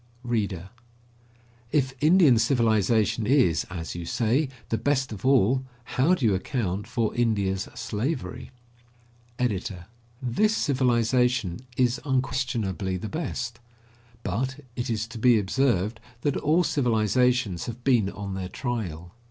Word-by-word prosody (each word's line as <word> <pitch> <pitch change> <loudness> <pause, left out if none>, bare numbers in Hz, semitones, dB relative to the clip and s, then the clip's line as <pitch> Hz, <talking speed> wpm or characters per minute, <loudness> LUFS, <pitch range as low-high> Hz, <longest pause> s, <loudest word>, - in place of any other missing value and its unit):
READER: 100 -6 -2 1.0
If 135 -3 +1
Indian 155 -6 +6
civilization 110 -3 +2
is, 125 - +3
as 85 -2 -5
you 85 -1 -6
say, 125 - +1 0.2
the 115 - 0
best 135 0 0
of 105 +3 -4
all, 130 -1 +4 0.2
how 140 +9 +2
do 140 - -2
you 105 - +4
account 100 -1 -2
for 115 -2 -1
India's 100 -5 0
slavery? 120 - -3 0.9
EDITOR: 100 -7 -2 0.3
This 145 - +1
civilization 125 -5 +1 0.2
is 125 -1 +2
unquestionably 125 - -1
the 105 +4 -5
best; 125 -7 -4 0.6
but 130 +9 -2
it 120 - -3
is 110 -1 -1
to 110 0 -9
be 120 0 +5
observed 110 0 +1 0.2
that 145 - 0
all 160 +4 +2
civilizations 120 - +1
have 120 +1 -7
been 120 -7 +3
on 100 0 -6
their 95 -1 -4
trial. 90 - -4
120 Hz, 125 wpm, -26 LUFS, 100-130 Hz, 1.0 s, Indian